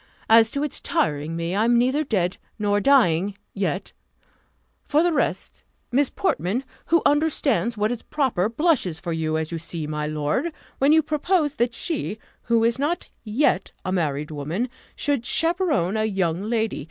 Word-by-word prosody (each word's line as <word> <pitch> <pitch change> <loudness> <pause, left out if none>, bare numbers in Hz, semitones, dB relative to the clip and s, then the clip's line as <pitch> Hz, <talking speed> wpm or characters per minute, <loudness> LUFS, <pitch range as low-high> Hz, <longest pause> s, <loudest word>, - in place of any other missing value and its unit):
As 225 0 +7
to 280 +4 -2
its 300 - -3
tiring 150 +1 -1
me, 170 +1 -2
I 210 - +2
am 240 0 +4
neither 260 +5 +2
dead, 190 - 0 0.2
nor 205 -1 +1
dying, 200 -6 +3 0.2
yet; 190 -2 -2 1.0
for 305 +2 +3
the 350 -1 +2
rest, - - -2 0.3
Miss 275 +2 +3
Portman, 240 - -1 0.2
who 335 -1 +3
understands 285 -6 +2
what 210 +2 +1
is 245 - -3
proper, 245 -10 0
blushes 235 - +1
for 170 0 -4
you, 160 -1 -1
as 160 0 -3
you 165 - -3
see, 165 -1 -4
my 150 0 -3
lord, 150 - -1 0.3
when 275 +2 +4
you 320 0 +5
propose 305 +1 +1
that 240 0 0
she, 300 -10 -2 0.3
who 230 -1 +3
is 230 +2 +1
not 310 +5 -2
yet 215 -3 +1
a 185 - -1
married 150 -4 -1
woman, 155 - -3 0.3
should 285 -5 0
chaperon 325 - +1
a 215 0 +1
young 190 -5 0
lady. 220 0 -1
225 Hz, 165 wpm, -23 LUFS, 175-285 Hz, 1.0 s, As